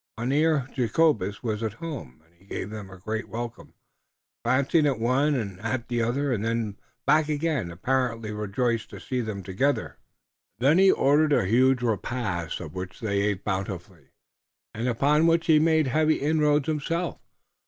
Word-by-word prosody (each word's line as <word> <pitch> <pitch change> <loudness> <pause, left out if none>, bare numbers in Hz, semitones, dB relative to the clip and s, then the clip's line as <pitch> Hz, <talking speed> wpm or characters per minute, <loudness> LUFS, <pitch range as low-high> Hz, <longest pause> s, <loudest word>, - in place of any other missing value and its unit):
Mynheer 140 +3 +1
Jacobus 120 - +1
was 110 -2 -2
at 110 -3 -2
home, 110 - -8
and 80 - -30
he 85 +3 -25
gave 100 0 -5
them 105 -3 -7
a 95 - -11
great 110 +5 -4
welcome, 120 +1 -7 0.7
glancing 140 +6 +3
at 135 -4 +1
one 135 +6 +2
and 100 -7 -4
at 115 +3 -3
the 120 -1 0
other, 130 +4 0
and 105 -3 -2
then 115 -3 -2 0.3
back 155 0 +3
again, 150 - -1
apparently 115 +4 -1
rejoiced 105 +3 -1
to - - -9
see 125 -1 -2
them 105 -4 -5
together. 115 +11 -1 0.6
Then 145 +8 +4
he 195 0 +7
ordered 150 +2 +3
a 95 - +3
huge 125 +5 +3
repast, 110 -6 -2
of 80 -4 -8
which 95 0 -6
they 100 -3 0
ate 100 -1 -1
bountifully, 95 -3 -4 0.7
and 115 +3 -3
upon 145 +6 +3
which 165 0 +3
he 155 -2 +5
made 160 0 +3
heavy 155 +4 +2
inroads 150 -1 +2
himself. 165 +2 -2
120 Hz, 165 wpm, -26 LUFS, 105-145 Hz, 0.7 s, he